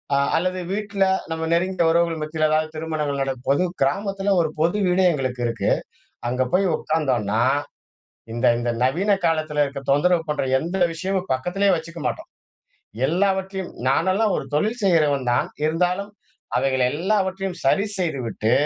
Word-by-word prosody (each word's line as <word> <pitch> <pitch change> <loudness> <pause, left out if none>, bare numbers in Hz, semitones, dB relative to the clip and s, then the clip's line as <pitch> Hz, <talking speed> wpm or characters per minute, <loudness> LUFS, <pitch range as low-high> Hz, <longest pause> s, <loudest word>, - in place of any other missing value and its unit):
அ - - +3 0.2
அல்லது 185 +2 -1
வீட்ல 200 -1 -1 0.3
நம்ம 160 0 -2
நெருங்கிய 185 0 +1
உறவுகள் 170 -1 +1
மத்தியில 155 0 0
எதாவது 155 0 +1
திருமணங்கள் 155 -3 -2
நடக்கும்போது, 135 +3 0 0.2
கிராமத்தில 195 +7 0
ஒரு 160 - 0
பொது 170 +5 +2
வீடு 180 +1 +3
எங்களுக்கு 130 -5 -2
இருக்கு. 115 - -1 0.6
அங்க 125 +1 0
போய் 190 +2 +3
உட்காந்தோன்னா, 125 -9 0 0.9
இந்த 120 +2 -1
இந்த 120 0 -2
நவீன 170 +11 +1
காலத்தில 155 -2 +1
இருக்கிற 140 -1 -5
தொந்தரவு 165 +4 +3
பண்ற 150 -2 0 0.2
எந்த 170 +6 -3 0.2
விஷயமும் 190 +2 -2
பக்கத்திலே 180 +10 0
வச்சுக்க 165 +1 -7
மாட்டோம். - - -5 0.8
எல்லாவற்றையும் 190 +2 0 0.2
நானெல்லாம் 190 +9 +2
ஒரு - - -3
தொழில் 215 +11 0
செய்றவன் 150 -8 +2
தான். 120 - +1 0.2
இருந்தாலும் 180 +5 0 0.5
அவைகள் 130 0 +1
எல்லாவற்றையும் 190 +2 -1
சரி 195 +9 +3
செய்துவிட்டு, 125 - -1
165 Hz, 135 wpm, -22 LUFS, 140-190 Hz, 0.9 s, அ